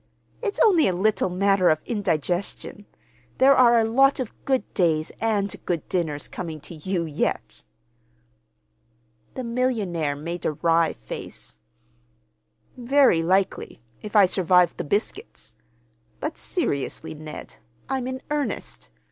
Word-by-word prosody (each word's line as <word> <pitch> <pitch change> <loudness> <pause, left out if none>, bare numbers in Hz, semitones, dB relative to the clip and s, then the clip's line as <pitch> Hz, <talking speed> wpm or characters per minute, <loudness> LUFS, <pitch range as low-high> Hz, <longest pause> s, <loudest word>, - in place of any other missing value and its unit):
It's 415 -4 -2
only 360 -8 +5
a 185 - 0
little 205 +1 +1
matter 195 0 +3
of 155 - +3
indigestion. 195 - -2 0.5
There 270 +1 +6
are 240 -2 +6
a 225 - +3
lot 270 +5 +3
of 250 -4 -4
good 265 -5 +1
days 160 -4 +1
and 205 -3 0
good 170 -4 -2
dinners 155 -6 -2
coming 160 -3 -6
to - - -9
you, 170 +2 -2
yet." 155 -2 -3 1.7
The 255 - -4
millionaire 215 - -1
made 170 +4 -6
a - - 0
wry 165 +1 +2
face. - - -8 1.2
"Very 255 -7 +4
likely—if 185 - -2
I 205 -2 +8
survive 180 -2 +3
the - - -4
biscuits. 210 - -3 0.7
But, 305 +1 -3
seriously, 160 - -2
Ned, 155 0 -9 0.3
I'm 265 -1 -2
in 260 0 -5
earnest. 200 - -3
190 Hz, 120 wpm, -24 LUFS, 165-245 Hz, 1.7 s, I